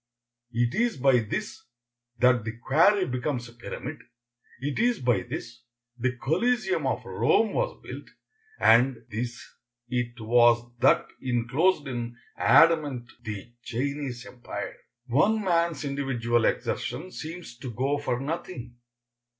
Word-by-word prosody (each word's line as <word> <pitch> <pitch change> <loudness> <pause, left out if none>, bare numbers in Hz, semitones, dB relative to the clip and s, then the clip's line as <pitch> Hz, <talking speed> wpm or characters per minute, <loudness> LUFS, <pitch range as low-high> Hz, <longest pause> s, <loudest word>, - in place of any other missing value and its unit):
It 120 0 +1
is 235 -4 +1
by 130 -1 +4
this 170 - -4 0.5
that 125 -1 +4
the 115 +1 -5
quarry 175 - +4
becomes 125 -2 -2
a 120 - -14
pyramid; 135 +5 -7 0.6
it 145 +5 -3
is 240 0 +2
by 120 -6 +2
this 115 +5 -7 0.3
the 125 0 -1
Coliseum 240 - +1
of - - -2
Rome - - +2
was - - -1
built; - - -8 0.5
and 120 0 +4
this 120 +3 -3 0.5
it 120 -1 -2
was 120 +1 +4
that 130 - +4 0.2
inclosed 135 +7 +1
in 120 -2 -4 0.2
adamant 145 -7 +4
the 110 +2 -7
Chinese 130 0 -3
empire. 115 -4 -7 0.3
One 200 - +2
man's 170 -5 +1
individual 120 -5 0
exertion 155 +10 -2
seems 165 -6 -7
to 130 - -6
go 135 +5 0
for 125 -4 -1
nothing. 135 -4 -5
125 Hz, 125 wpm, -27 LUFS, 120-155 Hz, 0.6 s, by